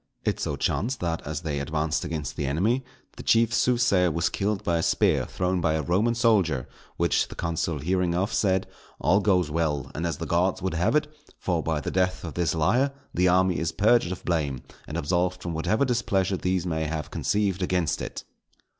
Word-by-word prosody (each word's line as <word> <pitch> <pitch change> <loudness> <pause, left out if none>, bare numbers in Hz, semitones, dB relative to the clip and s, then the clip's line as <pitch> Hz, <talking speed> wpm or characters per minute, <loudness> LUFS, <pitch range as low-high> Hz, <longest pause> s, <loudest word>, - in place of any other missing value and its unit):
It - - 0
so - - -2
chanced 120 +4 -1
that 85 -2 -1
as 75 0 -3
they 75 -4 -2
advanced 75 +2 -1
against 75 -4 -4
the 70 - -2
enemy, 105 - +1 0.3
the - - -6
chief 115 0 +3
soothsayer 120 -7 +3
was 85 +3 0
killed 100 0 -1
by 85 -1 +1
a - - 0
spear - - +2
thrown 90 0 -1
by 80 -1 +2
a 80 -1 -1
Roman 105 +10 +1
soldier; 100 - +2 0.3
which, 85 -2 +2
the - - -10
consul 85 -1 -2
hearing 90 +3 0
of, 95 +5 0
said, 95 -2 +2 0.3
"_All 90 +8 +3
goes 90 -6 +2
well, 75 -4 -1
and 85 +2 -2
as 85 - -3
the - - -4
Gods 90 +2 +1
would 95 -1 -2
have 85 - +1
it, 150 0 +3 0.3
for 85 -3 -1
by 80 -1 -1
the - - -3
death 90 0 0
of 80 - -5
this 85 -2 0
liar 120 - +2 0.2
the 90 +1 +3
army 90 0 +3
is 80 0 -1
purged 105 -1 +3
of 90 - -6
blame 75 -7 -1 0.2
and - - -4
absolved 90 +3 0
from 85 - -3
whatever 90 - +1
displeasure 100 -6 +1
these 90 -1 -1
may 80 -2 -1
have 75 0 -4
conceived 100 -3 0
against 90 -5 0
it_." - - -6
90 Hz, 200 wpm, -26 LUFS, 80-95 Hz, 0.3 s, chief